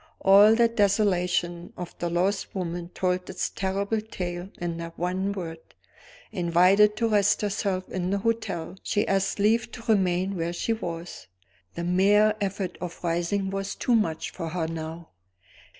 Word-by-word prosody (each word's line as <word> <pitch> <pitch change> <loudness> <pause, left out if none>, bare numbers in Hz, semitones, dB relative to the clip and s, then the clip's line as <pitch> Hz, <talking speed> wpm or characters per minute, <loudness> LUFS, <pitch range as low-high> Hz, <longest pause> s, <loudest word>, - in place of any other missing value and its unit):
All 200 +3 +7
the 235 0 +5
desolation 180 -5 +1
of 180 -1 -7
the 175 - -1
lost 185 +5 -1
woman 175 -2 -4
told 180 0 -1
its 185 - -2
terrible 200 +3 -1
tale 180 -4 -5
in 170 -1 -3
that 170 0 -7
one 185 +3 -1
word. 165 -5 -5 0.7
Invited 185 +3 +4
to 230 - +1
rest 205 0 +3
herself 195 -2 -1
in 180 -1 -3
the 200 - +1
hotel, 205 -5 -2
she 205 - 0
asked 195 0 +1
leave 220 +2 +2
to 235 - -8
remain 190 -2 +2
where 170 0 -2
she 225 +6 -1
was; 170 -5 -6 0.5
the 170 - -4
mere 200 +4 +4
effort 195 -1 -3
of 180 0 -7
rising 175 +3 -1
was 195 0 -3
too 245 - 0
much 170 -9 0
for 165 -3 -5
her 170 0 -2
now. 165 0 -6
190 Hz, 155 wpm, -26 LUFS, 175-205 Hz, 0.7 s, All